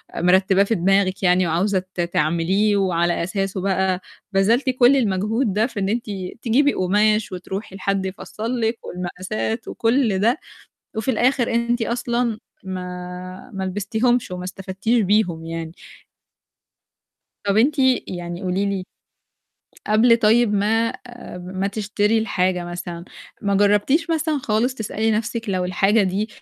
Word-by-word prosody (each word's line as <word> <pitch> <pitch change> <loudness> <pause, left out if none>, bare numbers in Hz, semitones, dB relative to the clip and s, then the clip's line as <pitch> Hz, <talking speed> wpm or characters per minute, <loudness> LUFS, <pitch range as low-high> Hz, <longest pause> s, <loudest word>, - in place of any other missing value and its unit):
ومرتباه 190 +2 +4
في 225 +3 0
دماغِك 195 +1 +1
يعني 180 0 +4
وعاوزة 185 +4 +1 0.2
ت 175 - 0
تعمليه، 175 +5 +1
وعلى 175 -3 +1
أساسه 195 +1 -2
بقى 190 -1 0 0.3
بذلتِ 225 +8 +3
كل 255 +1 +5
المجهود 215 0 0
ده 215 +4 +2
في 230 -5 -6
إن 195 0 0
أنتِ 235 +2 -1 0.4
تجيبي 275 +5 +3
قماش 210 +3 +2
وتروحي 190 +2 -6
لحد 195 0 -1
يفصّل 220 +5 -4
لِك 225 +1 0
والمقاسات 185 +5 -4
وكل 230 -4 +1
ده، 230 +8 +3 0.6
وفي 220 +4 0
الآخر 245 0 +1
أنتِ 235 0 +1
أصلًا 235 -1 -1 0.3
ما 180 +1 -7
ما 195 -1 -3
لبستيهمش 220 +4 0
وما 180 0 -5
استفدتيش 195 +5 -1
بيهم 185 -5 +1
يعني. 165 -1 -5 1.7
طَب 200 0 +1
أنت 280 +7 +3 0.3
يعني 175 0 -6
قولِي 190 +2 0
لي 195 -2 -2 1.0
قبل 230 +2 +5
طيب 225 -1 +3
ما 225 +4 +1 0.5
ما 185 +2 -3
تشتري 210 +1 0
الحاجة 185 -4 0
مثلًا، 175 0 -6 0.4
ما 200 -1 +1
جرّبتيش 210 - +3
مثلًا 315 -2 0
خالص 245 +1 0
تسألي 220 -1 -1
نَفسِك 225 +1 -2
لو 185 -2 0
الحاجة 195 +4 +2
دي 195 +3 -1
200 Hz, 130 wpm, -22 LUFS, 185-225 Hz, 1.7 s, كل